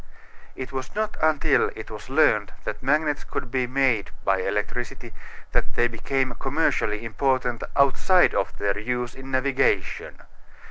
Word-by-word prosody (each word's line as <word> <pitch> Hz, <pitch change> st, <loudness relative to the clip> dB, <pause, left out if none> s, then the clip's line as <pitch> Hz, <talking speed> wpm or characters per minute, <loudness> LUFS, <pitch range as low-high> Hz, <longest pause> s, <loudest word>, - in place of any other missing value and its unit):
It 130 Hz, +1 st, -6 dB
was 130 Hz, +6 st, -6 dB
not 215 Hz, 0 st, -1 dB
until 155 Hz, -2 st, +3 dB
it -, -, -8 dB
was -, -, -9 dB
learned -, -, +3 dB
that -, -, -5 dB
magnets 150 Hz, +2 st, +1 dB
could 125 Hz, -, -5 dB
be 130 Hz, -1 st, 0 dB
made 125 Hz, -5 st, +1 dB, 0.2 s
by 95 Hz, -1 st, +3 dB
electricity 115 Hz, +4 st, -3 dB, 0.4 s
that -, -, -1 dB
they 120 Hz, -, +3 dB
became 130 Hz, +3 st, -1 dB
commercially 130 Hz, -6 st, 0 dB
important 125 Hz, 0 st, 0 dB
outside 145 Hz, +6 st, +4 dB
of -, -, -1 dB
their 100 Hz, 0 st, 0 dB
use 125 Hz, +2 st, -2 dB
in 135 Hz, 0 st, -10 dB
navigation. 130 Hz, 0 st, 0 dB
130 Hz, 140 wpm, -25 LUFS, 120-140 Hz, 0.4 s, outside